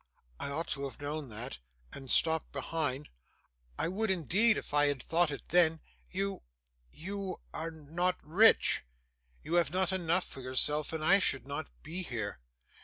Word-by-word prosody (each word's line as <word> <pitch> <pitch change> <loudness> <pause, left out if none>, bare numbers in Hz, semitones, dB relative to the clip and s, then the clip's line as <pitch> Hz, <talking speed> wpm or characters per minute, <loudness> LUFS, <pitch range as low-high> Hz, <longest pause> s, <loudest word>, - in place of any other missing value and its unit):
I - - -1
ought 160 +4 -2
to 140 0 -2
have 135 -4 -7
known 145 -1 -4
that, 115 +5 -6 0.3
and 135 -2 -8
stopped 160 +3 +3
behind 145 0 -2 0.7
I - - +1
would, 205 +5 -1
indeed, 190 - +3
if - - -7
I 145 0 +5
had 140 -3 -1
thought 170 0 +2
it 140 - -7
then. 165 -2 +4 0.3
You 195 +1 -3 0.5
you 195 +2 -5 0.2
are 165 +1 -3
not 165 +3 -2
rich; 200 +9 +5 0.6
you 160 - -5
have 170 - -3
not 185 +2 0
enough 180 0 +1
for 135 - -9
yourself, 145 +4 +2
and 160 -1 -3
I 195 +4 +6
should 135 -9 +1
not 145 +3 -5 0.2
be 165 +5 -5
here. 110 - -4
160 Hz, 165 wpm, -31 LUFS, 140-180 Hz, 0.7 s, I